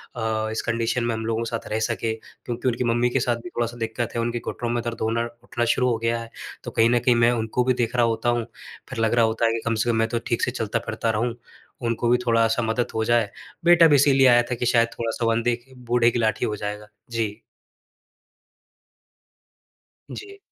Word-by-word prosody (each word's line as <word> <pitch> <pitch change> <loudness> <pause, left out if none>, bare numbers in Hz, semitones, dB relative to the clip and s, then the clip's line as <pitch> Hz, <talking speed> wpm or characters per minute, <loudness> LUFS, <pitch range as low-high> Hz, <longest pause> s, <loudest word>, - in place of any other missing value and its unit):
अ, 110 -1 -1
इस 110 - -2
कंडीशन 115 +1 0
में 120 - 0
हम 110 - -4
लोगों 115 0 -1
के 115 - -4
साथ 115 -1 -5
रह 110 - 0
सके। 110 0 -1
क्योंकि 120 +2 -7
उनकी 125 0 0
मम्मी 120 +1 +2
के 135 - 0
साथ 120 0 +1
भी 180 - -7
थोड़ा-सा 120 -4 -3
दिक्कत 115 0 -3
है, 115 - 0
उनके 120 +1 -1
घुटनों 120 +1 -4
में 120 0 0
दर्द 115 -1 -5
होना 115 +1 0 0.2
उठना 120 0 -2
शुरू 125 0 +2
हो 115 - +1
गया 115 +1 0
है। 115 - -9 0.3
तो - - -6
कहीं 115 0 +3
न 120 0 +3
कहीं 125 0 +3
मैं 120 +1 +4
उनको 115 +1 0
भी 130 +1 +2
देख 115 +1 -3
रहा 120 -1 +4
होता 115 +1 0
हूँ। 120 -1 0 0.4
फिर 130 -3 -6
लग 115 0 +2
रहा 120 -1 +4
होता 110 +1 0
है 115 - +3
कि 115 - -2
कम 115 - +1
से 110 +2 0
कम 115 - +2
मैं 115 0 +2
तो 115 - -1
ठीक 115 - 0
से - - +1
चलता-फिरता 115 -1 -2
रहूँ, 115 +2 -1 0.5
उनको 115 0 0
भी 125 - +5
थोड़ा-सा 115 0 +3
मदद 115 +2 -1
हो 110 - +1
जाए। 120 -2 +2 0.4
बेटा 170 -1 +7
भी 150 - +5
इसीलिए 135 -1 +5
आया 120 -1 +6
था - - +1
कि 120 - -3
शायद 115 -1 +4
थोड़ा-सा 115 0 -2
वो 115 - +3
अंधे 115 +1 +1
की 125 +3 -19
बूढ़े 120 0 +3
की 120 - -1
लाठी 110 -1 +1
हो 105 - -2
जाएगा। 105 +1 -5 0.2
जी। 115 -2 -2 2.7
जी। 400 -1 -9
115 Hz, 230 wpm, -24 LUFS, 115-120 Hz, 2.7 s, बेटा